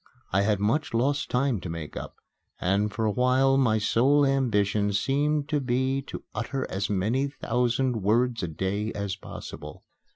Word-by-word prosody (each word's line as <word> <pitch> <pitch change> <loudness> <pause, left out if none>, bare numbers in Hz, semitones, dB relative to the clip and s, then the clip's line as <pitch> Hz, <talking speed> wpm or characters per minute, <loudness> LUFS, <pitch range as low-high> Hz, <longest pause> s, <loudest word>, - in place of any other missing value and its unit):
I 95 - +4
had 105 -1 +1
much 115 +6 0
lost 140 +5 +1
time 125 -3 +1
to 90 - -7
make 80 -2 -6
up; - - -7 0.4
and 100 +3 +1
for 110 +1 -2
a 105 - +2
while 130 +3 +3
my 125 -5 +3
sole 135 +7 +3
ambition 105 -6 +1
seemed 145 +7 +1
to 150 -1 +1
be 130 +1 0
to - - -7
utter 135 -1 -3
as 95 +1 -2
many 110 +8 +1
thousand 125 -2 0
words 115 +4 +2
a 90 - -2
day 95 +6 -2
as 100 -2 -3
possible. 75 -6 -9
115 Hz, 165 wpm, -27 LUFS, 100-135 Hz, 0.4 s, I